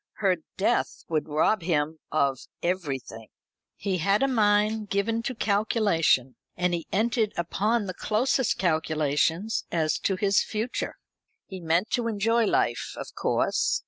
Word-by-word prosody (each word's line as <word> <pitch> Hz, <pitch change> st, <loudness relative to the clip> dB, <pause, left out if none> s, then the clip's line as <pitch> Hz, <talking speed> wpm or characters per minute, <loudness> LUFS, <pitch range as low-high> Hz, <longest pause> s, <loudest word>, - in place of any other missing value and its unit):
Her 190 Hz, -4 st, +1 dB, 0.2 s
death 220 Hz, +5 st, 0 dB
would 155 Hz, -1 st, -1 dB
rob 160 Hz, +7 st, +2 dB
him 160 Hz, -2 st, -1 dB
of 140 Hz, -4 st, 0 dB, 0.2 s
everything. 135 Hz, -, -3 dB, 0.5 s
He 190 Hz, -3 st, -2 dB
had 200 Hz, +8 st, +2 dB
a -, -, +3 dB
mind 210 Hz, -3 st, +2 dB
given 225 Hz, +3 st, 0 dB
to 250 Hz, +2 st, -4 dB
calculation, 200 Hz, -, +1 dB, 0.2 s
and 180 Hz, 0 st, +1 dB
he 170 Hz, -2 st, -3 dB
entered 220 Hz, +1 st, +1 dB
upon 205 Hz, +6 st, 0 dB
the 185 Hz, -, -4 dB
closest 235 Hz, +6 st, +1 dB
calculations 160 Hz, +3 st, 0 dB
as 155 Hz, -2 st, +1 dB
to 195 Hz, -, 0 dB
his 195 Hz, +1 st, +2 dB
future. 225 Hz, +3 st, -3 dB, 0.5 s
He 190 Hz, -, -8 dB
meant 170 Hz, +5 st, 0 dB
to 240 Hz, -2 st, 0 dB
enjoy 225 Hz, +2 st, +2 dB
life, 120 Hz, -, 0 dB
of -, -, -7 dB
course. -, -, +1 dB
195 Hz, 140 wpm, -26 LUFS, 160-215 Hz, 0.5 s, a